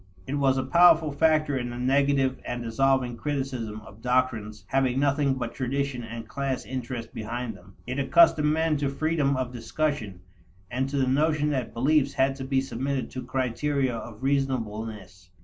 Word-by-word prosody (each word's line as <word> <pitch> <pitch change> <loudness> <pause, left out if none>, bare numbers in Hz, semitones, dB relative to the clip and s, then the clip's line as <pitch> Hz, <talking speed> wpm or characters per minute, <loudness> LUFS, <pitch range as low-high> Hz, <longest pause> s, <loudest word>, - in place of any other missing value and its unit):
It 135 - -4
was 135 -2 +2
a 130 - 0
powerful 165 +1 +5
factor 155 0 +2
in 120 -2 -2
the 120 - -6
negative 135 +1 +2
and 120 0 -4
dissolving 125 +1 +1
criticism 130 -7 -3
of 105 +1 -15
doctrines 120 -4 0
having 130 0 +1
nothing 140 -1 +2
but 120 -3 -4
tradition 135 -1 -2
and 115 0 -7
class 135 +1 -3
interest 125 -2 -5
behind 115 +1 -4
them; 95 +1 -17
it 130 +3 -3
accustomed 150 - +5
men 160 -1 +1
to 140 -1 0
freedom 145 -1 0
of 125 -1 -3
discussion 120 - -2 0.5
and 130 +2 -1
to 140 - -2
the 135 - +3
notion 150 +3 +2
that 130 -4 -3
beliefs 140 +3 +2
had 135 0 +2
to 135 - -5
be 135 0 +1
submitted 135 0 -3
to 130 - -5
criteria 130 +1 -1
of 115 +1 -8
reasonableness. 110 -8 -2
130 Hz, 165 wpm, -26 LUFS, 120-140 Hz, 0.5 s, powerful